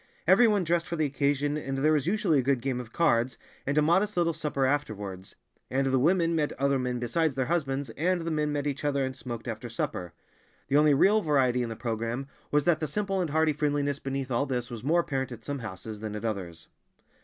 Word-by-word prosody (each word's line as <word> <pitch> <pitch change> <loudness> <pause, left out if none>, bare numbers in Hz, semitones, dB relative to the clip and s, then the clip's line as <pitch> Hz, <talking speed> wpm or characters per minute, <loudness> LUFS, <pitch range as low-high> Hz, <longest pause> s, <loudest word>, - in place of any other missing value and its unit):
Everyone 215 -5 +5
dressed 170 0 0
for 170 - -3
the 155 -2 +1
occasion, 145 +1 0
and 135 -2 -3
there 155 +3 +3
was 150 -1 +1
usually 180 -6 +2
a - - +3
good 135 0 +1
game 130 0 -2
of 120 -2 -8
cards, 125 -6 +2 0.3
and 140 +2 0
a 150 - +5
modest 190 +6 +2
little 170 -1 +2
supper 145 -4 -1
afterwards, 105 -9 -3 0.3
and 135 +1 +1
the 130 -1 +2
women 170 +3 +3
met 150 -2 0
other 140 0 +1
men 125 -1 -1
besides 135 +5 0
their 130 -1 0
husbands, 140 -5 -1
and 175 +8 0
the 165 0 -3
men 150 -1 0
met 145 -1 -2
each 145 0 -3
other 140 -2 +1
and 130 0 -4
smoked 120 -3 -7
after 115 +1 -5
supper. 90 -6 -3 0.6
The 140 - +4
only 150 -1 +5
real 205 +9 +4
variety 130 -7 +2
in 120 - -2
the 115 - -5
programme 115 +3 -3 0.2
was 150 0 +2
that 160 0 +3
the 155 - -2
simple 195 +1 -1
and 170 - -1
hearty 160 +1 +2
friendliness 145 -1 0
beneath 135 -1 -4
all 125 +4 +1
this 125 -2 -3
was 115 -2 -7
more 165 +5 +3
apparent 135 -5 -3
at 115 -1 -12
some 145 -1 -3
houses 105 -1 -7
than 105 -1 -5
at 105 - -5
others. 90 -7 -4
140 Hz, 225 wpm, -28 LUFS, 125-155 Hz, 0.6 s, Everyone